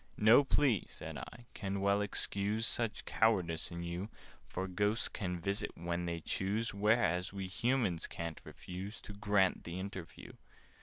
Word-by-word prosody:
"No 110 +6 +7
plea," 135 - +3
said - - -6
I, 120 - -9
"can 100 -1 -2
well 100 +1 +3
excuse 105 +1 0
Such 115 -1 -1
cowardice 90 -8 +2
in 85 0 -5
you: 85 +4 -3 0.4
For 95 - -3
Ghosts 105 +4 +1
can 90 -3 -3
visit 100 +4 -2
when 85 +1 -2
they 85 -1 -2
choose, 105 +6 -1
Whereas 100 -4 +2
we 100 -1 -3
Humans 110 -2 +1
ca'n't 85 -1 -5
refuse 95 +4 -7
To 105 - -8
grant 100 -2 +2
the 85 +2 -5
interview." 95 -3 -7
100 Hz, 150 wpm, -35 LUFS, 90-105 Hz, 0.4 s, No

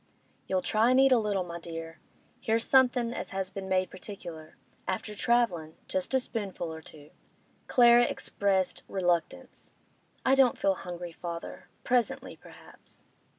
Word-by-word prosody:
'You'll 185 -1 0
try 220 +5 +3
an' 255 - +4
eat 270 0 +6
a 250 - +6
little, 205 -3 0
my 170 -1 -7
dear? 165 -1 -8 0.4
Here's 225 +1 +1
somethin' 250 -3 +3
as - - -5
has 195 -2 -4
been 195 0 -6
made 185 0 +1
particular. 175 -6 -9 0.3
After 215 -1 -3
travellin'—just 190 -3 0
a - - +5
spoonful 200 -9 -4
or 160 - -8
two.' 150 -1 -15 0.6
Clara 240 -1 +6
expressed 195 -5 -1
reluctance. 175 -3 -2 0.5
'I 265 - +4
don't 265 -2 +4
feel 195 - +2
hungry, 175 -1 -7
father. 170 +1 -7
Presently, 245 -2 0
perhaps. - - -15
195 Hz, 140 wpm, -29 LUFS, 175-235 Hz, 0.6 s, eat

